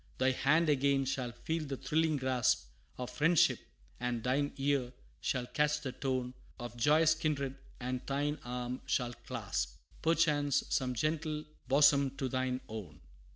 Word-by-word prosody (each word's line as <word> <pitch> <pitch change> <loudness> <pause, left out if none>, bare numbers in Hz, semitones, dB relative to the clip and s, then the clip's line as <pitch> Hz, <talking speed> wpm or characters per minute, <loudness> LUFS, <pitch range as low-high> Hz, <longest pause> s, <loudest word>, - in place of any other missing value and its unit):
Thy 130 0 +3
hand 155 +6 +3
again 140 -1 +3
shall 130 -2 -2
feel 160 +7 -3
the 140 -2 -4
thrilling 155 +1 +1
grasp 130 - +1 0.3
Of 125 -1 -5
friendship 160 +2 +4 0.4
and 120 -2 -2
thine 140 +3 +1
ear 135 -3 0 0.3
shall 125 -2 -1
catch 150 +3 +1
the 135 -3 -3
tone 130 -2 -2 0.3
Of 120 0 -6
joyous 155 +6 +5
kindred; 145 -4 -1 0.2
and 125 0 -3
thine 145 +2 -1
arm 125 +1 -4
shall 120 -1 0
clasp, 60 - -4 0.3
Perchance, 150 -4 +3
some 125 -1 0
gentle 155 +2 -1 0.2
bosom 140 0 +4
to 135 - -1
thine 130 0 -1
own. 95 -9 -7
135 Hz, 145 wpm, -33 LUFS, 125-150 Hz, 0.4 s, joyous